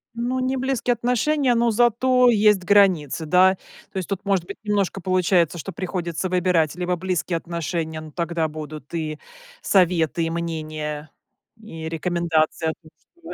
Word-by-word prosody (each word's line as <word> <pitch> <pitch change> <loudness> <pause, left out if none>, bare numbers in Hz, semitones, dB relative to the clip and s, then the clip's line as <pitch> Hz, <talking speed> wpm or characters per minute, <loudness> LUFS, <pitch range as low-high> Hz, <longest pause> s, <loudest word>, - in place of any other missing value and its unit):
Ну, 245 +2 -1
не 260 +1 -1
близкие 255 -2 0
отношения, 250 +3 +1
но 235 0 +2
зато 245 +2 +4
есть 210 -4 +4
границы, 180 -6 +3
да. 185 +4 +5 0.4
То - - -7
есть 185 -1 -4
тут, 195 0 -4
может 195 -4 +1
быть, 200 - -8
немножко 200 -3 -1
получается, 180 -2 +2
что 185 +4 -6
приходится 180 -1 -3
выбирать 180 -4 +1
либо 180 0 -1
близкие 180 -1 -2
отношения, 165 -1 -4
но 155 - -10
тогда 170 -1 -1
будут 155 -1 -9
и 155 -2 -3 0.4
советы, 170 -4 +2
и 165 - -1
мнения, 155 -2 -4 0.5
и 165 -7 -8
рекомендации 165 -1 0
о 160 - -2
том, 155 -2 -20 0.3
что - - -7
180 Hz, 155 wpm, -23 LUFS, 160-205 Hz, 0.5 s, да